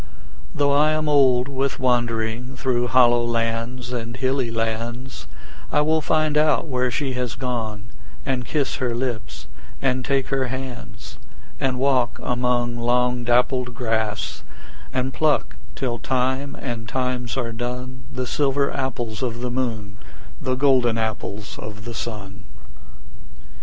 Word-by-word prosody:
Though 145 -1 +3
I 150 +2 +5
am 155 0 0
old 130 -4 +5
with 135 0 -1
wandering 120 0 0
Through 125 -2 +1
hollow 120 -1 +5
lands 115 +2 -1
and 115 0 -4
hilly 130 -1 +1
lands, 115 +3 -3 0.4
I 150 - +4
will 155 +1 +3
find 155 0 +2
out 155 0 +3
where 125 -4 +1
she 135 +2 -1
has 125 -3 -2
gone, 115 -5 -3 0.4
And 130 -2 0
kiss 140 +1 0
her 125 -2 0
lips 120 -2 -3 0.3
and 130 -1 +1
take 135 0 +1
her 135 -1 +1
hands; 125 -4 -7 0.4
And 130 -1 +1
walk 130 -2 +2
among 120 -1 +1
long 125 +1 +2
dappled 125 0 +2
grass, 110 -3 -1 0.5
And 130 0 -1
pluck 155 -2 +2 0.2
till 120 -3 -2
time 130 +4 0
and 115 -3 -4
times 125 -1 -1
are 115 -3 -1
done 125 +2 -4
The 130 - -2
silver 140 +3 +1
apples 120 -5 -2
of 120 -2 -2
the 125 0 -2
moon, 110 -5 -2 0.4
The 130 0 0
golden 130 -4 +4
apples 110 -2 -3
of 105 0 -7
the 120 - -5
sun. 105 -2 -6
125 Hz, 135 wpm, -23 LUFS, 115-130 Hz, 0.5 s, I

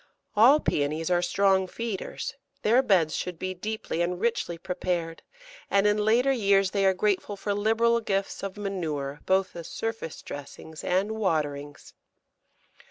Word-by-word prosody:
All 250 +8 +7
Pæonies 155 - -1
are 175 0 +3
strong 190 +1 +2
feeders. 225 0 -4 0.3
Their 235 +5 +5
beds 180 -10 +2
should 180 -2 -4
be 185 +2 -3
deeply 210 -2 -3
and 175 +1 -1
richly 225 -7 -1
prepared, 175 -2 -3 0.5
and 200 0 +3
in 210 0 +3
later 240 +5 +3
years 195 -6 +3
they 195 -1 +2
are 190 - +4
grateful 205 +1 0
for 205 +1 -2
liberal 225 +3 +2
gifts 195 -3 -2
of 195 0 -5
manure, 155 -8 -3
both 190 0 +2
as 170 -1 -7
surface 225 -8 -5
dressings 155 +2 -9
and 190 +4 +1
waterings. 150 -9 -2
195 Hz, 145 wpm, -27 LUFS, 170-215 Hz, 0.5 s, All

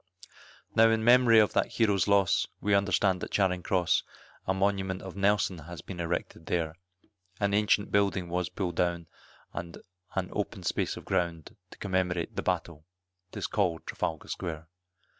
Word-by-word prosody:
Now 115 0 +6
in 110 0 +1
mem'ry 120 -1 +6
of 105 -1 +5
that - - +1
hero's 105 -4 +2
loss, 100 -4 +3
we 105 - +1
understand 100 -2 +2
at - - -4
Charing 90 -3 +1
Cross, 90 -2 +2 0.5
A 95 - +2
monument 95 -1 0
of 95 -1 -8
Nelson 100 -2 +1
has 85 +2 -9
been 90 -3 -8
erected 85 -1 -3
there; 80 -2 -1 0.6
An 100 -1 +1
ancient 105 0 +2
building 100 -3 +1
was 90 +1 -1
pulled 90 -4 -3
down, 85 -1 0 0.5
and 85 0 -6 0.4
an - - -1
open - - -3
space - - -1
of - - -10
ground 85 -4 -2
To - - -14
commemorate 90 -3 -1
the - - -1
battle, 80 -3 -2 0.5
it - - -9
is - - -2
call'd 85 -2 0
Trafalgar 80 - -3
Square. 80 -3 -5
95 Hz, 160 wpm, -29 LUFS, 85-100 Hz, 0.6 s, Now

